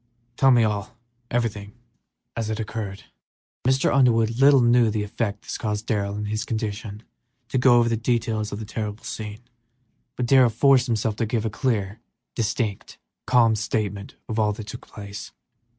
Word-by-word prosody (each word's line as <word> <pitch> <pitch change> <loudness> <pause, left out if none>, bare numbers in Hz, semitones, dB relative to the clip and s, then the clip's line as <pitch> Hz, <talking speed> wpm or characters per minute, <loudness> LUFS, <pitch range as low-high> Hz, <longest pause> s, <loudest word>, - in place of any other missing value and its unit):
"Tell 135 +2 +4
me 120 -3 +5
all, 105 +1 -2 0.3
everything, 105 -4 -2
just - - -31 0.6
as 115 -1 -2
it 110 0 -2
occurred." 105 -3 -5 0.6
Mr. 130 +1 +3
Underwood 115 -4 +3
little 140 -1 +7
knew 120 -1 +4
the 105 -1 -1
effort 105 0 -2
it - - -4
cost 105 -2 -2
Darrell 100 -3 -1
in 105 0 -3
his 110 +1 -2
condition 110 -1 -4 0.5
to 130 - 0
go 125 -1 +6
over 120 -1 +4
the 115 - +1
details 115 -2 -1
of 100 - -4
the 110 - -6
terrible 105 0 -5
scene, 105 +1 -6 0.7
but 125 - -2
he 130 -1 +6
forced 130 +3 +4
himself 110 -2 -1
to 115 - -1
give 115 0 -1
a 110 - -1
clear, 105 -5 -1 0.4
succinct, 110 -2 -2 0.3
calm 115 -3 +4
statement 105 -1 -3
of 110 -1 -2
all 105 -1 +2
that 110 0 -8
took 110 +4 -9
place. 100 -1 -9
110 Hz, 170 wpm, -24 LUFS, 105-120 Hz, 0.7 s, little